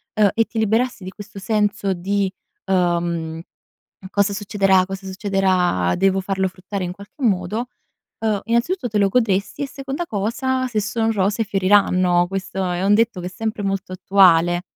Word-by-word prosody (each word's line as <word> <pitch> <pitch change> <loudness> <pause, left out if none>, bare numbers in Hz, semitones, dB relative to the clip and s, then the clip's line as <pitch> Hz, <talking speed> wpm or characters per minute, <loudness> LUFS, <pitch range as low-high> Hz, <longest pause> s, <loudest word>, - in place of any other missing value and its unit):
uhm, 210 -2 +4
e 225 - +2
ti 230 - -9
liberassi 220 +1 0
di 185 - -6
questo 205 +1 -12
senso 205 -1 0
di, 195 +2 -1 0.3
uhm: 170 -3 0 0.7
"Cosa 200 0 +1
succederà, 195 -2 +2
cosa 195 +1 -7
succederà? 185 - +1
Devo 195 0 +2
farlo 190 0 -1
fruttare 185 +1 -6
in 175 - -4
qualche 200 +8 -12
modo." 210 +2 0 0.6
Uhm, 210 -3 +1
innanzitutto 245 +6 0
te 210 - -1
lo 200 -1 +3
godresti, 205 +2 0
e - - -3
seconda 275 +4 -5
cosa: 255 +5 -1
se 220 -4 -1
son 225 +2 0
rose 205 +1 0
fioriranno, 185 -3 +3
questo 195 0 -5
è 175 +1 -2
un 200 +1 +4
detto 225 -3 +1
che 175 - -4
è - - -5
sempre 220 +3 -4
molto 195 -1 -2
attuale. 175 -2 +4
195 Hz, 165 wpm, -21 LUFS, 185-220 Hz, 0.7 s, uhm